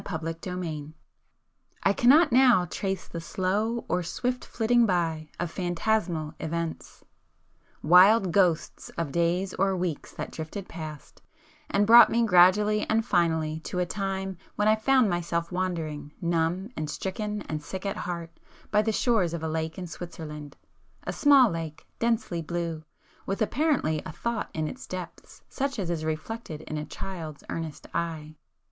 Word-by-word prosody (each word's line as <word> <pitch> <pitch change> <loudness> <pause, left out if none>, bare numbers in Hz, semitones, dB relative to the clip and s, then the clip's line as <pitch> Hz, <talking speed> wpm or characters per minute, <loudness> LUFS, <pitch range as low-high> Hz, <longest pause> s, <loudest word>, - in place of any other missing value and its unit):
[p 180 - -5
300]XXVI 165 -2 -5 0.9
I 195 - +4
cannot 275 +10 +5
now 245 -7 +6
trace 190 +3 -3
the 170 - -6
slow 205 +7 -1
or 180 - 0
swift 250 +8 -2
flitting 235 0 +2
by 165 -4 0
of 175 -2 -2
phantasmal 175 -3 -1
events,... 165 0 -4 0.8
wild 185 +4 +6
ghosts 175 -3 +1
of 165 -4 -2
days 175 +3 0
or 195 0 +1
weeks 175 -4 -3
that - - -6
drifted 165 +5 -6
past, 155 -3 -9 0.5
and 205 - +2
brought 235 +3 +9
me 235 0 +2
gradually 205 +3 +5
and 220 0 +2
finally 160 -5 +1
to 170 - -6
a 180 - +2
time 190 -1 -3 0.2
when 210 - +1
I 215 - +6
found 255 +2 +3
myself 170 -1 -1
wandering, 160 -5 -3
numb 170 +4 0
and 155 -1 -3
stricken 210 +5 -3
and 155 -1 -4
sick 190 +6 -7
at 195 - -2
heart, 170 -2 -4 0.4
by 210 - +4
the 220 +1 0
shores 210 -7 +1
of 165 - -6
a - - -1
lake 160 0 -3
in 185 - -5
Switzerland,—a 155 -4 -9
small 275 -6 +6
lake, 165 -2 -6
densely 230 -7 0
blue, 165 -1 -3 0.4
with 195 - -2
apparently 235 - +1
a - - -7
thought 235 +6 -3
in 155 -1 -1
its 255 - -8
depths 180 -2 -8
such 275 -1 -2
as 180 -5 -2
is 160 -2 -2
reflected 160 +1 -4
in 155 -1 -5
a 150 - -4
child's 160 -6 -7
earnest 160 -3 -5
eye. 160 -2 -3
180 Hz, 155 wpm, -27 LUFS, 160-210 Hz, 0.9 s, brought